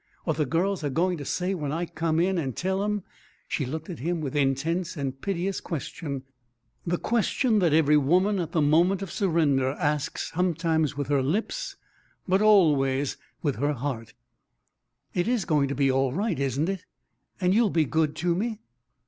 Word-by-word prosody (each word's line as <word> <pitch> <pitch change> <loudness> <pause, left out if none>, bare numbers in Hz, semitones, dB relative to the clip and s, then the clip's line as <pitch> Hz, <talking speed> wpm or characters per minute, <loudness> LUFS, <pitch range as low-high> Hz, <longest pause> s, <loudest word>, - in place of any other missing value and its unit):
What 160 -3 -1
the 150 -3 +1
girls 180 +5 0
are 145 - 0
going 175 +4 0
to 145 - -6
say 180 +6 -1
when 150 -6 -3
I 165 +3 -1
come 160 -1 -1
in 185 +1 +2
and 135 -6 -3
tell 190 +2 0
'em 210 -2 -1 0.2
" - - -33
She 140 - -2
looked 160 +4 -5
at 175 - -7
him 170 +5 -1
with 150 -2 -4
intense 150 +6 0
and 135 -2 -4
piteous 195 0 -2
question 140 -3 -5 0.6
the 175 +1 +1
question 230 +1 +1
that 175 -5 +3
every 150 -1 +5
woman 185 +8 +3
at 170 -2 -3
the 160 -3 +2
moment 175 +6 +3
of 195 - -6
surrender 150 -9 +2
asks 150 -2 -2
sometimes 165 -4 0
with 145 - -2
her 140 -2 +3
lips, 220 - -2 0.5
but 190 +2 +3
always 145 -10 +4 0.3
with 145 -7 0
her 145 +4 +1
heart: 125 -4 -5 1.0
"It 175 +3 0
is 240 -4 +1
going 150 -5 +2
to 140 - -3
be 135 -1 +3
all 135 0 +1
right, 190 - -1
isn't 140 +3 0
it? 190 -2 -3 0.6
And 180 -1 +2
you'll 225 0 +4
be 160 -3 +2
good 155 +1 0
to 175 +1 +1
me?" 220 +5 -2
160 Hz, 185 wpm, -26 LUFS, 145-185 Hz, 1.0 s, every